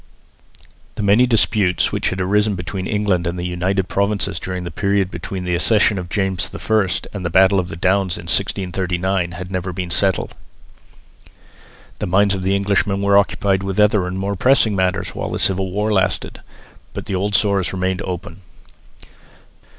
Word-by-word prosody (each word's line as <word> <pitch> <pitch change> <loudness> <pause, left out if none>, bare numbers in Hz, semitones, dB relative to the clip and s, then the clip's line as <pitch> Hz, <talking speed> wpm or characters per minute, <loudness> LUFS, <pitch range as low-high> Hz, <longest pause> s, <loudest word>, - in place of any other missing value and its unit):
The 105 - -3
many 105 +5 +4
disputes, 105 -5 +2
which - - 0
had 95 - -4
arisen 105 +2 +1
between 95 +1 -5
England 100 -5 0
and 85 +1 -3
the 90 - -4
United 90 +2 -1
Provinces 100 -2 0
during 90 -1 -5
the 85 - -6
period 100 +1 0
between 90 +2 -5
the 90 -1 -2
accession 105 +2 +2
of 90 -1 -7
James 95 -2 -1
I 110 -3 +1 0.3
and 100 -3 -5
the 85 - -1
battle 95 +2 +4
of 90 -1 -3
the - - -6
Downs 95 +1 +1
in - - -8
1639, 90 -1 -1
had 90 +1 -7
never 90 -1 -3
been 90 -1 -5
settled. 95 +2 +1 1.7
The - - -2
minds 100 +2 +3
of 95 -1 -3
Englishmen 100 0 +1
were 100 0 +3
occupied 100 -1 +2
with 95 +1 -3
other 105 -3 +3
and 90 +1 -4
more 100 +1 -2
pressing 115 -1 +3
matters 95 0 0
while - - -5
the - - -3
Civil 95 0 0
War 105 +3 -1
lasted. 95 -2 -1 0.5
But - - -5
the - - -4
old 100 +2 0
sores 100 -3 +2
remained 95 0 -1
open. 90 +1 -6
95 Hz, 170 wpm, -19 LUFS, 90-100 Hz, 1.7 s, many